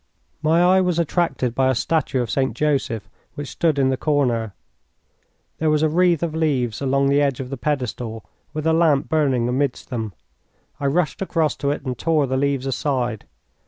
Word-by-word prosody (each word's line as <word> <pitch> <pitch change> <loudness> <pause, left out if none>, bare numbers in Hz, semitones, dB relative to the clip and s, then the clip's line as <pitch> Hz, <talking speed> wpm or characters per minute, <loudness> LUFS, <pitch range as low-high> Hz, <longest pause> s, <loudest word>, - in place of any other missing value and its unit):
My 160 +3 +3
eye 185 +1 +5
was 180 -2 0
attracted 155 -7 0
by 130 +1 +2
a 130 - +2
statue 135 -2 0
of 115 - -5
St. 135 -1 0
Joseph 135 -8 0 0.3
which 145 -2 -6
stood 160 -4 +1
in 135 -1 +3
the 130 - 0
corner. 125 -8 0 1.0
There 160 - +2
was 155 0 +2
a 155 - +3
wreath 170 0 +2
of 165 -2 -2
leaves 135 -8 0
along 135 0 +2
the 140 +1 +3
edge 140 -3 +1
of 130 0 -6
the - - -2
pedestal, 125 -5 -3 0.3
with 155 0 -4
a 160 - +3
lamp 155 -4 +3
burning 135 -7 +2
amidst 130 +2 -1
them. 110 -5 -3 0.7
I 140 - 0
rushed 160 +5 0
across 165 -5 0
to 140 - -1
it 145 0 -3
and 130 -1 -2
tore 155 +1 +1
the 130 0 -2
leaves 135 -1 0
aside. 130 -4 -1
140 Hz, 190 wpm, -22 LUFS, 130-155 Hz, 1.0 s, eye